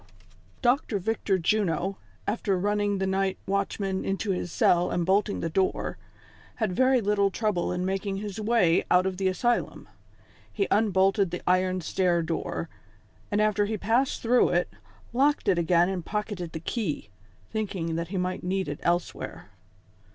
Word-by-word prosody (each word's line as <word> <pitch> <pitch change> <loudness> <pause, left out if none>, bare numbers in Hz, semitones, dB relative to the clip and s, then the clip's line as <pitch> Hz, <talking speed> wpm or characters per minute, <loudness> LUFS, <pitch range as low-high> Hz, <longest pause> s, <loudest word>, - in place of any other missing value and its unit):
fOCTOE 245 -3 +2
VICTOR 205 -1 0
JUNO, 190 0 0 0.3
after 205 -2 0
running 205 +1 0
the 190 - -1
night 190 0 0
watchman 195 0 -1
into 195 +1 -1
his 180 -2 -3
cell 175 +1 +3
and 175 - 0
bolting 200 +2 +1
the 165 - -1
door, 190 +3 0 0.6
had 220 -6 -1
very 255 +4 +3
little 200 -1 +2
trouble 200 -4 -1
in 180 0 -2
making 195 +1 -2
his 205 +1 -5
way 210 -6 +3
out 180 +1 +4
of 190 -1 -2
tlie 190 0 +1
asylum. 240 +6 -1 0.6
He 400 - -1
unbolted 195 -2 +3
the 180 - -5
iron 185 0 +2
stair 175 0 +1
door, 165 0 -3 0.6
and 205 - 0
after 210 -1 +2
he 215 +1 -2
passed 235 +6 +1
through 245 +2 +4
it, 175 +1 +1 0.4
locked 285 +4 +2
it 185 -3 +3
again 170 +1 +3
and 185 -2 -3
pocketed 205 -5 -4
the 160 - -4
key, 165 - -3 0.4
thinking 190 -6 -2
that 170 +1 -2
he 190 +2 -4
miglit 180 0 -2
need 190 +1 -1
it 145 - -5
elsewhere. 170 - -2
195 Hz, 160 wpm, -27 LUFS, 180-210 Hz, 0.6 s, out